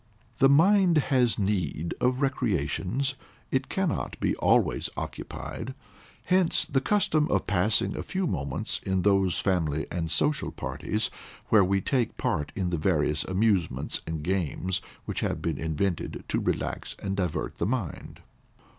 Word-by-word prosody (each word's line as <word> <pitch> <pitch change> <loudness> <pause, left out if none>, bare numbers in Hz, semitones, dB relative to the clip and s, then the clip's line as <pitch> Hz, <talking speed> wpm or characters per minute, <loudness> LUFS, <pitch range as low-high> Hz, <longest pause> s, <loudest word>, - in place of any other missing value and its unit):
The 135 - +6
mind 175 +3 +5 0.2
has 125 -3 +4
need 90 -6 -1
of 125 +2 +2
recreations; 120 - 0 0.4
it 130 0 0
cannot 190 -5 -1
be - - +1
always - - +2
occupied. - - -6 0.5
Hence 185 -2 +3
the 135 - 0
custom 155 -5 +2
of - - +1
passing 100 +2 +2
a - - -3
few 190 0 -2
moments 70 - -2
in 95 -1 0
those 95 -3 +3
family 80 -6 0
and 85 -2 -2
social 150 - +1
parties, 105 +1 -2 0.4
where 105 -3 +6
we 95 +1 +1
take 125 +2 0
part 75 0 -1
in 90 -2 -1
the 85 - 0
various 75 -2 +1
amusements 95 - +1
and 80 -2 -3
games 90 +1 -1 0.2
which - - -3
have - - -1
been 80 -5 -2
invented 80 +3 -2
to - - +1
relax - - -2
and 95 -1 -3
divert 90 -5 -2
the - - +1
mind. 110 - -4
95 Hz, 145 wpm, -27 LUFS, 85-130 Hz, 0.5 s, The